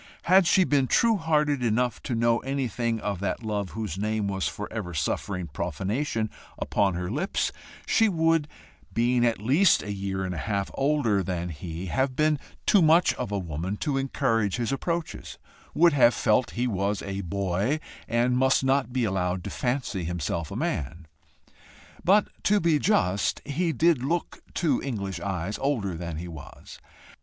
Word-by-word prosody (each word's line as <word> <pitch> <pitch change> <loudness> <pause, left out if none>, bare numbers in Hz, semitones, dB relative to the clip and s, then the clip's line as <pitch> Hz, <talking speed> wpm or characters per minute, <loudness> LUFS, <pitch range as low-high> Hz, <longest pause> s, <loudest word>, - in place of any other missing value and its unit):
Had 185 0 +5
she 185 - +5
been 140 -6 +2
true 230 - +4
hearted 150 -5 +1
enough 120 +1 0
to 120 - -3
know 115 0 +2
anything 125 -4 -2
of 100 -3 -2
that 100 +4 -2
love 105 -3 -2
whose 100 -5 -3
name 105 0 -1
was 95 -2 -1
for 105 - -5
ever 95 -7 -4
suffering 90 +4 -2
profanation 100 - -2 0.3
upon 100 -3 +1
her 90 +2 -3
lips, 155 - -1 0.3
she 225 -1 +3
would, 165 -3 +2 0.4
being 120 +1 +2
at 115 -3 +2
least 145 - +4
a 105 - -4
year 95 -1 -3
and 90 - -3
a 85 - -4
half 100 +4 -2
older 135 -8 +1
than 90 -2 -3
he, 85 +2 -6
have 130 +7 0
been 155 0 +2 0.3
too 200 - +5
much 165 +2 +5
of - - -5
a 100 - 0
woman 90 +2 -4
to 145 +2 -1
encourage 120 -6 0
his 120 0 -1
approaches 165 +4 -3 0.4
would 170 0 +5
have 125 -4 +5
felt 120 +3 +2
he 120 - +1
was 100 -3 -1
a 100 0 -4
boy 100 - -1 0.3
and 120 +2 +2
must 130 0 +3
not 135 -1 +1
be 125 -1 0
allowed 90 -3 -1
to - - -5
fancy 120 -7 -2
himself 85 -1 -3
a - - -7
man. 80 +4 -3 1.0
But 200 +3 +4 0.2
to 210 +1 +4
be 165 -4 +2
just, 100 - +1
he 165 +4 0
did 160 -2 +2
look 165 +5 -2
to 165 -3 +1
English 100 -8 -4
eyes 100 +1 -3
older 120 -9 -1
than 85 -1 -5
he 85 +2 -6
was. 80 -4 -11
115 Hz, 170 wpm, -26 LUFS, 95-140 Hz, 1.0 s, Had